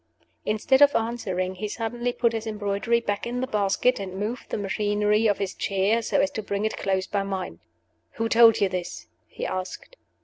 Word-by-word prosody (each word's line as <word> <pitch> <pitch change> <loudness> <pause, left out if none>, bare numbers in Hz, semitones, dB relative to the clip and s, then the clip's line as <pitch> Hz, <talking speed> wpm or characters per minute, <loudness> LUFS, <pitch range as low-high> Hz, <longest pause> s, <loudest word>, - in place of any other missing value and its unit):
Instead 220 +6 +2
of 285 0 +7
answering, 190 -6 -1
he 190 +3 -4
suddenly 240 +3 -2
put 235 -1 +1
his 225 0 -3
embroidery 210 +2 0
back 205 -1 -3
in 245 +1 -3
the 255 - 0
basket, 210 +2 +1
and 190 -2 -6
moved 220 +5 -4
the - - -2
machinery 210 +1 +1
of 205 - +2
his 195 -2 -3
chair, 200 +4 +1
so - - 0
as 190 - +2
to 220 - -4
bring 200 0 -2
it 220 - -1
close 190 -1 -1
by 200 0 -1
mine. 190 - -4 0.5
"Who 225 - -1
told 225 -1 +6
you 200 - +4
this?" 180 -11 -5 0.2
he - - -6
asked. 185 - -5
210 Hz, 195 wpm, -25 LUFS, 195-230 Hz, 0.5 s, of